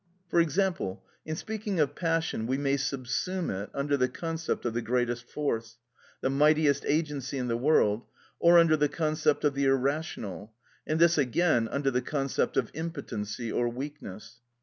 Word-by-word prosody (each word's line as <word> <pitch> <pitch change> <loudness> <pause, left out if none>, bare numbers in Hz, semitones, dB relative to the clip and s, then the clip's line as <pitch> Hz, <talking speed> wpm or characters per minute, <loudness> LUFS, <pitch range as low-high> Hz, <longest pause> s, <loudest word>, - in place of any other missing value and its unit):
For 170 - +3
example, 170 - 0 0.2
in 155 - -2
speaking 215 -1 -3
of 150 -3 +2
passion, 165 -9 -1
we 130 +2 0
may 140 -1 +1
subsume 140 +7 -2
it 100 +1 -4
under 140 +1 0
the 125 -1 +2
concept 165 +2 -3
of 120 - 0
the 120 - -1
greatest 120 0 -1
force, 115 -6 -3 0.4
the - - +1
mightiest 150 0 +3
agency 145 -3 -1
in 125 -2 -2
the 115 - +1
world, 120 -4 +2 0.3
or 170 +1 +7
under 165 -2 +6
the 150 -1 +2
concept 155 -1 0
of 145 -2 +3
the 140 0 0
irrational, 135 - -1 0.3
and 155 +1 0
this 170 -1 +5
again 130 -2 +2
under 140 +2 0
the 125 0 +1
concept 135 -2 -1
of 125 -5 +1
impotency 125 -9 -4
or 120 0 +1
weakness. 120 -4 -8
140 Hz, 165 wpm, -28 LUFS, 120-155 Hz, 0.4 s, or